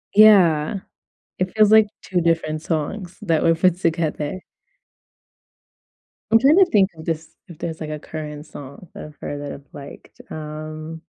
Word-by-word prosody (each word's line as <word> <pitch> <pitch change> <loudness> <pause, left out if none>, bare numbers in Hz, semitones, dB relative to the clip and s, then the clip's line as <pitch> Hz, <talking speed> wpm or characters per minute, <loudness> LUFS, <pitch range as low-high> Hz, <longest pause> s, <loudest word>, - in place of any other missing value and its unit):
Yeah. 185 -7 +6 0.6
It 185 0 -1
feels 215 -1 +5
like 220 -1 +6
2 180 -2 -1
different 160 -2 0
songs 170 +4 -4
that 165 -6 +1
were 165 - +4
put 175 +1 +2
together. 165 0 -1 1.9
I'm 225 - +6
trying 285 +8 +5
to 385 - +7
think 200 - +3
of 160 - -11
this 160 -1 -3 0.2
if 170 -4 -12
there's 165 -2 -5
like 155 - -5
a 155 0 -5
current 150 -1 -7
song 140 +4 -11
that - - -8
I've 150 -1 -14
heard 145 0 -5
that 145 - -6
I've 140 0 -11
liked. 140 -1 -12
Um 155 +1 -7
160 Hz, 160 wpm, -21 LUFS, 155-185 Hz, 1.9 s, to